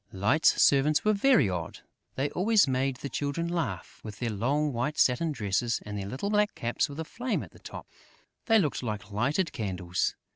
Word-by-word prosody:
Light's 105 Hz, +11 st, +2 dB
servants 145 Hz, +4 st, +4 dB
were 215 Hz, -, +4 dB
very 215 Hz, -, +4 dB
odd! 85 Hz, -3 st, -4 dB, 0.3 s
They 140 Hz, +2 st, -1 dB
always 210 Hz, +1 st, +3 dB
made 130 Hz, 0 st, 0 dB
the 135 Hz, -, -6 dB
Children 145 Hz, +5 st, -2 dB
laugh: 170 Hz, -2 st, -4 dB
with 105 Hz, -2 st, -8 dB
their 120 Hz, -1 st, -2 dB
long 140 Hz, +8 st, 0 dB
white 125 Hz, +6 st, -2 dB
satin 155 Hz, +6 st, +2 dB
dresses 115 Hz, -2 st, -1 dB
and 105 Hz, -1 st, -6 dB
their 100 Hz, -1 st, -4 dB
little 135 Hz, -, -3 dB
black 210 Hz, 0 st, +2 dB
caps 120 Hz, +5 st, -1 dB
with 140 Hz, +2 st, -8 dB
a 160 Hz, -, -3 dB
flame 245 Hz, +8 st, -3 dB
at -, -, -12 dB
the -, -, -17 dB
top, -, -, -9 dB, 0.6 s
they 225 Hz, -1 st, +5 dB
looked 160 Hz, -9 st, 0 dB
like 105 Hz, -4 st, -5 dB
lighted 145 Hz, -, 0 dB
candles. 95 Hz, -5 st, -2 dB
135 Hz, 190 wpm, -28 LUFS, 110-165 Hz, 0.6 s, they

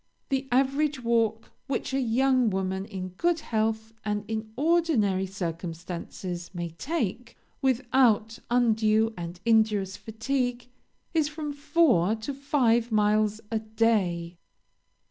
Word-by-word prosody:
The 270 Hz, 0 st, -1 dB
average 275 Hz, +2 st, +1 dB
walk 225 Hz, -1 st, +1 dB, 0.2 s
which 270 Hz, -1 st, -2 dB
a 270 Hz, -, +2 dB
young 255 Hz, 0 st, +3 dB
woman 190 Hz, 0 st, -2 dB
in 190 Hz, -3 st, -6 dB
good 330 Hz, -, 0 dB
health 220 Hz, -1 st, -1 dB
and 210 Hz, -1 st, -2 dB
in 220 Hz, 0 st, -4 dB
ordinary 275 Hz, -, +2 dB
circumstances, 175 Hz, 0 st, -5 dB
may 170 Hz, -1 st, -3 dB
take, 235 Hz, -, -3 dB, 0.2 s
without 240 Hz, -4 st, +2 dB
undue 225 Hz, -2 st, +3 dB
and 175 Hz, 0 st, -7 dB
injurious 215 Hz, -4 st, +2 dB
fatigue, 245 Hz, +2 st, -2 dB, 0.5 s
is 315 Hz, -3 st, +2 dB
from 300 Hz, -1 st, -5 dB
four 285 Hz, -, +3 dB
to 225 Hz, +6 st, -5 dB
five 250 Hz, -4 st, +1 dB
miles 215 Hz, 0 st, +2 dB
a 225 Hz, -, +1 dB
day. 205 Hz, -6 st, 0 dB
225 Hz, 115 wpm, -27 LUFS, 200-260 Hz, 0.5 s, young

